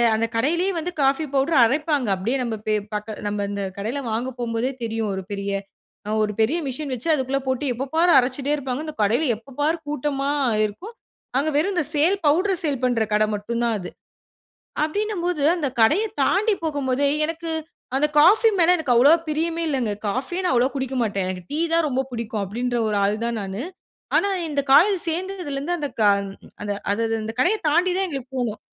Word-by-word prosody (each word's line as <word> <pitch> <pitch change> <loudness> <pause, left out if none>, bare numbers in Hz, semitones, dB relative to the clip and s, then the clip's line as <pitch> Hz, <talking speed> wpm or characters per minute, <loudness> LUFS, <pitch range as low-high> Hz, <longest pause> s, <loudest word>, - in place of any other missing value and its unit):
அந்த 225 - +1
கடையிலயே 340 +11 +1
வந்து 335 +2 -3
coffee 275 +3 +2
powder 275 -1 +4
அரைப்பாங்க. 290 0 0
அப்படியே 230 +9 -1
நம்ம 230 -2 -2
பே 215 - +2 0.2
பக்க 210 +1 -4 0.2
நம்ம 205 0 -2
அந்த 200 0 -3
கடையில் 235 +6 -3
வாங்க 235 +4 -1
போம்போதே 235 +2 -1
தெரியும், 225 -2 -2
ஒரு 190 - -4
பெரிய 200 0 -3 0.7
ஒரு 210 0 0
பெரிய 230 +10 +2
மிஷின் 275 +2 -4
வச்சு, 250 +5 -5
அதுக்குள்ள 270 -1 0
போட்டு 260 +2 -1
எப்போபார் 315 +8 +1
அரைச்சிட்டே 265 +3 -1
இருப்பாங்க. 270 -1 -3
இந்த 310 - -6
கடையில 225 +9 +2
எப்ப 240 +5 -15
பாரு 315 +3 +2
கூட்டமா 285 -1 -2 0.4
இருக்கும். 360 - -7 0.4
அங்க 290 +3 +1
வெறும் 345 +7 +2
இந்த 350 - +2
சேல் 325 +7 +4
பவுடர் 365 +5 +2
சேல் 285 -5 -1
பண்ணுற 245 -3 +2
கடை 215 +1 +4
மட்டும் 220 +3 -3
தான் 235 -1 +1
அது. 180 - -6 0.9
அப்படினும்போது, 355 -2 -1
அந்த 320 -5 -1
கடைய 300 - +4 0.2
தாண்டி 425 +3 +2
போகும் 285 -4 -2
போதே, 275 +3 +2 0.2
எனக்கு 330 +1 -4 0.5
அந்த 300 +2 +3
காஃபி 415 +9 +6
மேல 345 +2 +5
எனக்கு 285 -7 +1
அவ்வளவா 285 +8 +7
பிரியமே 330 +2 -1
இல்லங்க. 250 -7 0 0.2
காஃபியே 270 - -2
நான் 360 - +2
அவ்வளவா 250 +2 +2
குடிக்க 265 -1 -3
மாட்டேன். 200 -3 -1
எனக்கு 185 -1 -5
டீ 305 - -1
தான் 330 -2 +3
ரொம்ப 265 0 0
பிடிக்கும், 225 -3 -3
அப்படின்கிற 240 +5 -2
ஒரு 210 - 0
ஆள் 205 +2 +1
தான் 235 -1 -2
நானு. 195 +4 -5 0.5
ஆனா, 400 - +2 0.2
இந்த 290 -2 0
காலேஜ் 375 +8 +6
சேர்ந்ததில 360 -3 -3
இருந்து 340 +6 -2
அந்த 290 -2 -2
க - - +4 0.6
அது 205 - -2 0.2
அந்த 215 +3 -1 0.2
அந்த 220 +1 -4
கடைய 375 +10 +3
தாண்டி 350 +4 +3
தான் 385 - +1
எங்களுக்குப் 270 -4 -6
போணும். 235 -4 -2
275 Hz, 185 wpm, -23 LUFS, 230-320 Hz, 0.9 s, அவ்வளவா